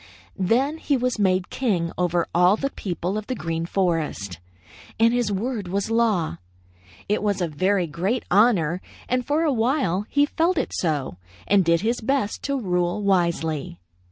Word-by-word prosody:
"Then 260 - +1
he 285 -3 +1
was 250 -2 -1
made 185 -2 +1
king 185 -10 0
over 175 -1 +1
all 180 +3 +5
the 275 +3 -2
people 185 +2 -3
of 215 - -10
the 255 - -2
Green 165 -1 -3
Forest, 165 - -1 0.6
and 230 +1 +5
his 240 -4 +1
word 210 0 -2
was 200 +4 -2
law. 220 -8 +1 0.7
It 210 - 0
was 205 -2 0
a 175 - 0
very 185 +4 +1
great 180 +10 -2
honor, 185 -5 +3 0.3
and 250 0 0
for 295 +5 +1
a 305 -4 +2
while 225 - 0
he 285 0 +3
felt 335 +4 0
it - - -1
so 145 - -1 0.3
and 200 -1 +4
did 170 -1 +2
his 235 +3 0
best 235 -3 -1
to 280 -1 0
rule 180 -1 -1
wisely. 170 - 0
200 Hz, 165 wpm, -23 LUFS, 175-240 Hz, 0.7 s, all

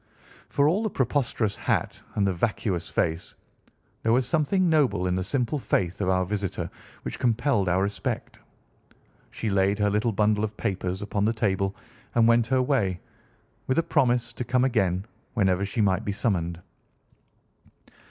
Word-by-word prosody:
For 140 0 +3
all 180 +7 +2
the 220 - 0
preposterous 120 - 0
hat - - -1
and 100 - +2
the 95 - +1
vacuous 95 -2 -1
face, 80 +1 -1 0.7
there 115 - +1
was 125 +2 +3
something 170 +5 +2
noble 135 - +2
in 90 - +1
the 95 0 0
simple 130 +7 -1
faith 90 -6 -1
of 95 - +1
our 95 0 +2
visitor 100 -1 -3 0.3
which - - -5
compelled 120 -4 +1
our 95 +2 +2
respect. 100 0 -3 0.9
She 110 - -3
laid 100 +1 +2
her 105 -1 +2
little 105 +3 +1
bundle 105 0 +2
of 110 -1 -3
papers 95 0 -2
upon 100 0 -1
the 110 - +2
table 100 -3 0 0.4
and 115 -1 +5
went 115 0 +4
her 130 0 +2
way, 105 -10 +1 0.7
with 130 - +1
a 165 - +4
promise 120 -6 +1
to 125 - -4
come 125 +1 +1
again 95 -7 +1 0.3
whenever 95 -3 +2
she 100 +3 -1
might 95 0 +2
be 100 - -2
summoned. 85 -5 -1
105 Hz, 160 wpm, -26 LUFS, 95-125 Hz, 0.9 s, and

